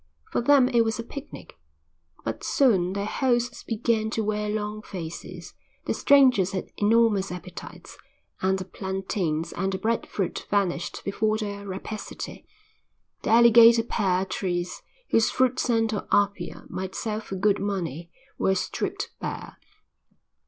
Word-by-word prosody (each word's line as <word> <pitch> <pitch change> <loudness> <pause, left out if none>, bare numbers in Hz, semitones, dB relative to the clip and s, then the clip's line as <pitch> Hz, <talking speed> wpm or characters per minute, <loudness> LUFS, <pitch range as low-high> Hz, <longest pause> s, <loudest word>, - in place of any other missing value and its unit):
For - - +1
them 270 0 +5
it 235 -2 +3
was 225 -1 0
a 230 - -4
picnic. 280 - -10 0.7
But 115 0 -4
soon 190 -10 +3
their 200 0 -2
hosts 240 +1 0
began 220 -1 0
to 220 0 -1
wear 210 0 -1
long 210 0 -3
faces; 175 -2 -8 0.3
the - - 0
strangers 255 -10 +4
had 190 - -4
enormous 210 -2 +3
appetites, 180 0 -9 0.4
and 190 0 +2
the 185 - -5
plantains 190 -4 -3
and 190 +2 -1
the 190 - -2
bread 225 +3 -1
fruit 195 -4 -3
vanished 190 -4 -1
before 215 +2 +1
their 200 -2 -5
rapacity; 200 +3 -7 0.7
the - - -3
alligator 235 0 +7
pear 190 -5 0
trees, 180 -2 -3 0.3
whose 225 - +4
fruit 260 0 +1
sent 225 -2 +1
to 210 - -3
Apia 200 -3 0
might 190 0 -5
sell 215 -1 -2
for 205 -3 -7
good 200 +2 +2
money, 175 -5 -3 0.3
were 190 - +2
stripped 180 - -3
bare. - - -6
205 Hz, 140 wpm, -26 LUFS, 190-225 Hz, 0.7 s, alligator